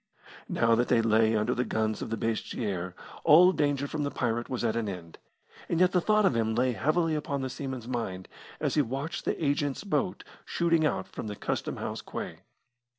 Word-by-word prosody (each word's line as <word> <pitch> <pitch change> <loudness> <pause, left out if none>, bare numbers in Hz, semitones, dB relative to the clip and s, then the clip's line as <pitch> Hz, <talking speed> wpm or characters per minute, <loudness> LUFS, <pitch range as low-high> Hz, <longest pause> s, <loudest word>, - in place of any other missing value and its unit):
Now 115 0 +3
that 120 +2 +2
they 115 - +4
lay 110 0 +4
under 105 0 +1
the 125 - 0
guns 110 -2 -1
of - - -4
Basseterre, 105 -5 -2 0.3
all 180 +5 +8
danger 145 -4 0
from 150 +1 -3
the 145 - 0
pirate 120 -3 -1
was 125 -2 -2
at 115 -1 +1
an 115 -3 -1
end, 85 -4 -8 0.5
and 170 - +1
yet 180 0 +5
the 180 - +3
thought 215 +2 +3
of 135 - +3
him 110 -1 +1
lay 125 +2 +2
heavily 155 +6 +1
upon 140 -3 -2
the 130 - -3
seaman's 130 -3 -5
mind 105 -7 -3 0.3
as - - 0
he 150 - +4
watched 140 +6 -4
the - - 0
agent's 145 +1 0
boat 195 -2 -1 0.2
shooting 165 -2 +2
out 95 - -2
from - - -7
the 105 - -4
Custom - - -3
house - - -4
quay. - - -6
125 Hz, 200 wpm, -29 LUFS, 110-150 Hz, 0.5 s, all